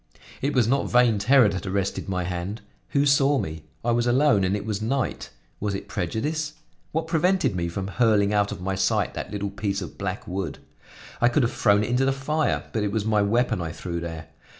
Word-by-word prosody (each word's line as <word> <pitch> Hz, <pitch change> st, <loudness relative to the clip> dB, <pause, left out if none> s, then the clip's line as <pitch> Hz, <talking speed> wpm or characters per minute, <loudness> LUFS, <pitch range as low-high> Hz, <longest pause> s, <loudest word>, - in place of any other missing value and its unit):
It 140 Hz, +2 st, -1 dB
was 120 Hz, -4 st, +4 dB
not 135 Hz, +3 st, +1 dB
vain 120 Hz, -4 st, +4 dB
terror 125 Hz, +3 st, +5 dB
that 95 Hz, 0 st, -4 dB
arrested 95 Hz, 0 st, -2 dB
my 90 Hz, -1 st, -1 dB
hand. 90 Hz, +4 st, -4 dB, 0.3 s
Who 140 Hz, 0 st, +2 dB
saw 140 Hz, 0 st, +4 dB
me? 80 Hz, -8 st, -4 dB, 0.2 s
I 120 Hz, -, +2 dB
was 120 Hz, +1 st, +1 dB
alone 130 Hz, -4 st, +4 dB
and 95 Hz, +2 st, +1 dB
it 105 Hz, -, -4 dB
was 105 Hz, -1 st, -2 dB
night. 130 Hz, +3 st, -2 dB, 0.3 s
Was 100 Hz, -1 st, -2 dB
it -, -, -6 dB
prejudice? 150 Hz, -, -2 dB, 0.4 s
What 160 Hz, +1 st, -1 dB
prevented 175 Hz, -, +1 dB
me 85 Hz, -1 st, -1 dB
from 95 Hz, +3 st, -4 dB
hurling 105 Hz, -2 st, +2 dB
out 105 Hz, -1 st, +2 dB
of -, -, -5 dB
my 95 Hz, +1 st, -2 dB
sight 95 Hz, -, +1 dB
that -, -, -5 dB
little 100 Hz, -1 st, -3 dB
piece 100 Hz, -1 st, -2 dB
of 90 Hz, -, -8 dB
black 100 Hz, +4 st, -4 dB
wood? 90 Hz, -5 st, -3 dB, 0.6 s
I 120 Hz, -, +5 dB
could 130 Hz, +3 st, +2 dB
have 120 Hz, -, 0 dB
thrown 105 Hz, -1 st, +3 dB
it -, -, -3 dB
into 125 Hz, +2 st, +2 dB
the 135 Hz, -, +3 dB
fire, 150 Hz, +3 st, 0 dB
but 110 Hz, -, 0 dB
it 105 Hz, -1 st, -1 dB
was 110 Hz, -1 st, -1 dB
my 110 Hz, -1 st, +3 dB
weapon 110 Hz, -1 st, +1 dB
I 80 Hz, -1 st, -3 dB
threw 85 Hz, +1 st, -5 dB
there. 80 Hz, -1 st, -7 dB
105 Hz, 220 wpm, -25 LUFS, 95-130 Hz, 0.6 s, terror